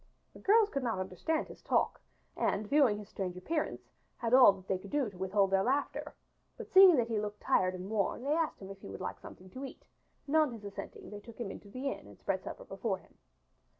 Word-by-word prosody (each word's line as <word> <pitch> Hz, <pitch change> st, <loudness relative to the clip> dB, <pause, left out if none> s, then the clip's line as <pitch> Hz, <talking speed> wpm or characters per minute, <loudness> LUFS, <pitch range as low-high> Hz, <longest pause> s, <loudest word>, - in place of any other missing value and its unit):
The -, -, -13 dB
girls 425 Hz, +1 st, +4 dB
could 275 Hz, -, -1 dB
not 230 Hz, -5 st, -1 dB
understand 185 Hz, -, -2 dB
his -, -, -12 dB
talk, -, -, +1 dB, 0.3 s
and 205 Hz, +2 st, 0 dB
viewing 270 Hz, -5 st, +4 dB
his 210 Hz, -1 st, -9 dB
strange 185 Hz, -3 st, -4 dB
appearance 305 Hz, -, -3 dB, 0.3 s
had 235 Hz, -1 st, -2 dB
all 255 Hz, -5 st, +9 dB
that 190 Hz, -1 st, -14 dB
they 190 Hz, -, 0 dB
could -, -, -11 dB
do 280 Hz, -7 st, 0 dB
to 185 Hz, -, -14 dB
withhold 195 Hz, +1 st, +2 dB
their 195 Hz, 0 st, +4 dB
laughter, 270 Hz, +7 st, -1 dB, 0.4 s
but -, -, -6 dB
seeing 380 Hz, -2 st, +9 dB
that 240 Hz, -4 st, +2 dB
he 225 Hz, -2 st, 0 dB
looked 210 Hz, 0 st, -4 dB
tired 185 Hz, 0 st, +2 dB
and 185 Hz, +1 st, -6 dB
worn 215 Hz, +2 st, -1 dB
they 285 Hz, +2 st, +1 dB
asked 320 Hz, -9 st, -1 dB
if 195 Hz, 0 st, -9 dB
he -, -, -9 dB
would 95 Hz, -, -7 dB
like -, -, -5 dB
something 185 Hz, 0 st, -12 dB
to 260 Hz, -, -7 dB
eat, 270 Hz, -, -9 dB, 0.4 s
and 290 Hz, -, -2 dB
on 305 Hz, -5 st, +4 dB
his 215 Hz, -3 st, -9 dB
assenting 200 Hz, +1 st, -8 dB
they 205 Hz, -, -7 dB
took 230 Hz, +2 st, -13 dB
him 215 Hz, -5 st, -3 dB
into 200 Hz, -, -11 dB
the 255 Hz, +6 st, -4 dB
inn -, -, -8 dB
and -, -, -14 dB
spread -, -, -2 dB
supper -, -, -7 dB
before -, -, -2 dB
him. -, -, -23 dB
215 Hz, 235 wpm, -32 LUFS, 195-280 Hz, 0.4 s, all